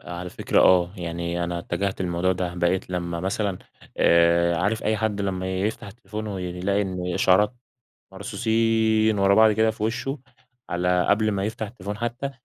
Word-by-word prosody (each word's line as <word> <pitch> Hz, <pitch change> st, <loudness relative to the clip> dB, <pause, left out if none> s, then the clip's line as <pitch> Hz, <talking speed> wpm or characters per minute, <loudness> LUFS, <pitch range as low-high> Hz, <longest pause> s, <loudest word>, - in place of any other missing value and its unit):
آآ، -, -, -12 dB
على 90 Hz, +1 st, -6 dB
فكرة، -, -, +1 dB
آه، 90 Hz, -1 st, +4 dB
يعني 85 Hz, 0 st, -3 dB
أنا 85 Hz, 0 st, -3 dB
اتجهت 95 Hz, +3 st, -3 dB
للموضوع 90 Hz, +1 st, 0 dB
ده، 90 Hz, -1 st, -3 dB
بقيت 90 Hz, +1 st, 0 dB
لما 85 Hz, -2 st, -3 dB
مثلًا 95 Hz, 0 st, -2 dB, 0.4 s
آآ، 85 Hz, 0 st, +4 dB
عارف 100 Hz, +6 st, 0 dB
أي 110 Hz, 0 st, +1 dB
حد 105 Hz, -1 st, -1 dB
لما 95 Hz, -1 st, -2 dB
يفتح 110 Hz, +3 st, -2 dB
التليفون 105 Hz, +1 st, -7 dB
ويلاقي 95 Hz, 0 st, -2 dB
إن 90 Hz, -2 st, -3 dB
إشعارات 105 Hz, +5 st, +3 dB, 0.6 s
مرصوصين 110 Hz, +1 st, +1 dB
ورا 100 Hz, 0 st, +4 dB
بعض 110 Hz, 0 st, +6 dB
كده 110 Hz, +1 st, +2 dB
في 105 Hz, -, -6 dB
وشه، 120 Hz, +6 st, -2 dB, 0.5 s
على 90 Hz, 0 st, +1 dB
قبل 110 Hz, +1 st, +3 dB
ما 100 Hz, -1 st, -1 dB
يفتح 110 Hz, 0 st, -4 dB
التليفون 105 Hz, -2 st, -7 dB
حتى، 120 Hz, +4 st, -3 dB
95 Hz, 165 wpm, -24 LUFS, 90-110 Hz, 0.6 s, بعض